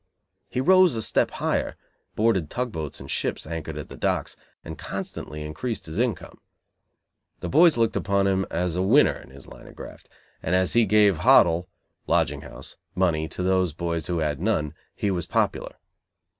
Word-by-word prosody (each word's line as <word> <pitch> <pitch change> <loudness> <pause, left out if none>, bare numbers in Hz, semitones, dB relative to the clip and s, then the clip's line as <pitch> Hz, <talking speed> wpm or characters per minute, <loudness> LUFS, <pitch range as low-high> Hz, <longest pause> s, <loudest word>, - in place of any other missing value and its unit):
He 125 - -1
rose 185 -1 +5
a 110 - -2
step - - +1
higher, - - -2 0.4
boarded 100 -8 +1
tug 125 -1 -3
boats 80 -5 -5
and 65 - -10
ships - - -2
anchored 80 -1 -5
at 75 - -6
the - - -10
docks, - - -1 0.3
and - - -6
constantly 75 0 -6
increased 110 +10 -4
his 80 +6 -5
income. 120 -4 -2 1.0
The - - -4
boys 160 0 +5
looked 115 -2 +1
upon 100 0 +1
him 95 0 +1
as 85 0 -2
a 90 - 0
winner 120 +11 +4
in - - -15
his 70 +1 -13
line - - -13
of - - -14
graft, - - -11 0.3
and 90 - 0
as 95 0 +1
he 120 -2 +4
gave 105 -3 +4
"hot'l" 85 +3 +4 0.4
(lodging 75 -4 +1
house) 65 -2 -11 0.2
money 80 -4 +1
to 90 - -5
those 95 -3 +1
boys 85 0 -3
who 90 - -1
had 75 -2 -1
none, 85 -8 0 0.2
he 100 - -1
was 90 -3 -3
popular. - - -1
90 Hz, 180 wpm, -25 LUFS, 80-110 Hz, 1.0 s, rose